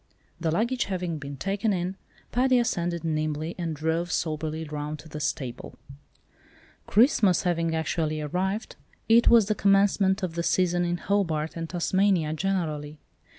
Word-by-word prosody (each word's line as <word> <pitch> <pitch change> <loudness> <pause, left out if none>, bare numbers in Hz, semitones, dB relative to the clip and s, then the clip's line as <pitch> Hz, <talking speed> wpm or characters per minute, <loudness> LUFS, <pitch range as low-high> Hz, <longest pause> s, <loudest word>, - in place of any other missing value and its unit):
The 165 -1 -1
luggage 235 +9 0
having 180 -4 -3
been 140 -1 -7
taken 200 - 0
in, 180 +1 -2 0.4
Paddy 255 +1 +3
ascended 175 -8 -1
nimbly, 155 0 -2
and 165 -2 -2
drove 160 +3 -1
soberly 155 0 -2
round 150 0 -5
to 150 +2 -13
the 150 - -6
stable. 130 -4 -4 1.1
Christmas 210 - +4
having 165 -2 0
actually 160 -1 -1
arrived, 190 +8 -2 0.3
it 230 +1 +5
was 230 -3 +7
the 215 - +1
commencement 195 -1 +3
of 180 -3 -2
the 170 - -2
"season" 175 0 +1
in 175 0 -1
Hobart 165 -5 -1
and 165 -1 -5
Tasmania 180 -2 +1
generally. 155 -4 -2
170 Hz, 145 wpm, -26 LUFS, 155-195 Hz, 1.1 s, was